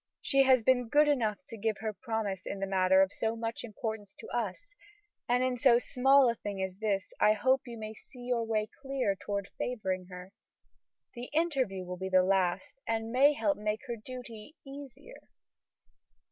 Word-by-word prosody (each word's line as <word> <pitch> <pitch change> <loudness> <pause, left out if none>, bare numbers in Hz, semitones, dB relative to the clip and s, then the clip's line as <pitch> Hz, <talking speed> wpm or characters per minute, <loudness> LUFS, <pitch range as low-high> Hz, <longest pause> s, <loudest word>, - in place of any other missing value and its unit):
She 275 - +3
has 260 -3 +5
been 250 -1 +3
good 295 +4 +5
enough 245 -4 0
to 230 - -8
give 215 0 -1
her 220 -1 -3
promise 215 -4 -3
in 200 - -4
the 195 - -1
matter 190 0 +4
of 195 - -2
so 225 0 -1
much 225 0 -4
importance 220 -2 -5
to 445 - -11
us, - - -4 0.6
and 250 +1 +3
in 255 -1 0
so 245 -1 +6
small 265 +2 +4
a 235 - +3
thing 205 -3 -6
as 190 -1 -3
this 200 -2 -1
I 215 - +5
hope 260 +4 +1
you 235 -1 -7
may 215 0 -6
see 245 +3 -9
your 245 -1 0
way 215 -1 0
clear 270 -7 -1
toward 200 0 -4
favoring 190 -7 -2
her. 180 0 -10 0.8
The 245 0 -7
interview 265 - 0
will 180 0 -6
be 190 +1 -4
the 185 -1 +5
last 195 +10 0
and 225 0 -1
may 275 +4 +5
help 295 0 0
to - - -11
make 210 +1 -1
her 240 -2 -3
duty 240 +3 -10
easier." 280 - -11
225 Hz, 190 wpm, -31 LUFS, 200-260 Hz, 0.8 s, so